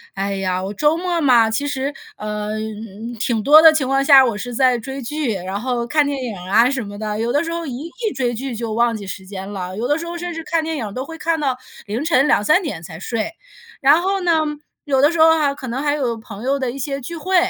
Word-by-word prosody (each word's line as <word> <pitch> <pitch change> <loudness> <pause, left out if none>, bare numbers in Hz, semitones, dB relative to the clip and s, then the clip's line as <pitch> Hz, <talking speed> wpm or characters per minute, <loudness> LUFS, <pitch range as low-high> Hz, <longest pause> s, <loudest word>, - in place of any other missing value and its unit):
哎 195 0 -2
呀， 185 -1 -1
我 195 - -4
周 300 +8 +3
末 350 0 -1
嘛， 245 -7 +5
其 225 +6 -1
实， 275 0 -2 0.3
呃， 210 0 -4
嗯， 220 +1 -7
挺 225 0 0
多 295 +7 +8
的 320 -1 +9
情 290 -4 0
况 270 +1 +1
下， 275 -2 +8
我 235 -5 0
是 245 +4 -6
在 255 0 +3
追 265 +4 -6
剧， 280 -1 -2
然 190 +1 -4
后 240 0 -2
看 295 +3 +2
电 280 -2 -2
影 220 -5 -5
啊 205 +7 +3
什 265 -3 -2
么 205 0 -8
的。 215 -1 -3
有 235 +2 -1
的 290 +3 +2
时 330 - -4
候 335 0 -3
一 275 +3 -5 0.2
一 415 - -2
追 245 -2 0
剧 245 +1 -4
就 225 -1 -4
忘 235 +1 +2
记 205 -2 -7
时 190 +1 -7
间 195 0 -7
了， 185 -2 -5
有 230 +4 -2
的 290 +2 +2
时 330 - -5
候 340 0 -5
甚 350 0 -4
至 325 0 -6
看 325 0 0
电 320 0 -3
影 215 -6 -5
都 255 +3 -3
会 325 +2 -9
看 330 0 0
到 270 -4 0 0.3
凌 225 +8 -3
晨 295 -4 +3
2-3 305 - +3
点 200 - -5
才 160 -1 -9
睡。 230 - -3 0.5
然 285 +4 +6
后 390 +1 0
呢， 350 -1 +2 0.5
有 270 -2 +1
的 290 +3 +5
时 340 - -3
候 320 +1 +7
啊， 295 -3 +2
可 260 -2 -8
能 250 +4 -3
还 290 0 +1
有 255 -5 -1
朋 220 -2 -10
友 275 +2 0
的 260 -2 -1
一 250 - -6
些 275 +1 -3
聚 335 +7 -6
会， 375 +4 -2
255 Hz, 280 characters per minute, -20 LUFS, 215-300 Hz, 0.5 s, 的